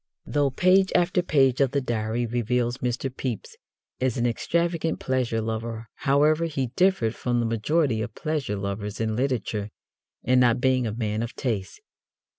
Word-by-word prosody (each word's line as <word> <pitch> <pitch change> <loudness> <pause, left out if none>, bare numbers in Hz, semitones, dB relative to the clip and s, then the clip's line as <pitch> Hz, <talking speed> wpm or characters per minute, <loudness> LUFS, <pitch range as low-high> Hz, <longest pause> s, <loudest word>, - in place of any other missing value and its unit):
Though 145 -1 +1
page 185 +7 +3
after 180 0 +3
page 135 -6 +3
of 135 -1 +2
the 140 - +2
Diary 120 -1 -1
reveals 120 +1 -1
Mr. 125 +1 -2
Pepys 125 -6 -4 0.4
as 130 -2 0
an 120 - +1
extravagant 165 +6 0
pleasure 125 -4 0
lover, 110 0 -4
however, 150 +4 +3
he 135 -7 -2
differed 180 - +2
from 120 0 -1
the 120 - +1
majority 115 +2 +1
of 110 -1 -5
pleasure 150 -9 -2
lovers 100 +1 -4
in 110 -1 -1
literature 115 -5 -1 0.5
in 125 +1 +4
not 120 -2 +4
being 130 -2 +2
a - - -2
man 110 -2 -1
of 115 +1 -5
taste. 105 -7 -3
125 Hz, 160 wpm, -25 LUFS, 115-140 Hz, 0.5 s, in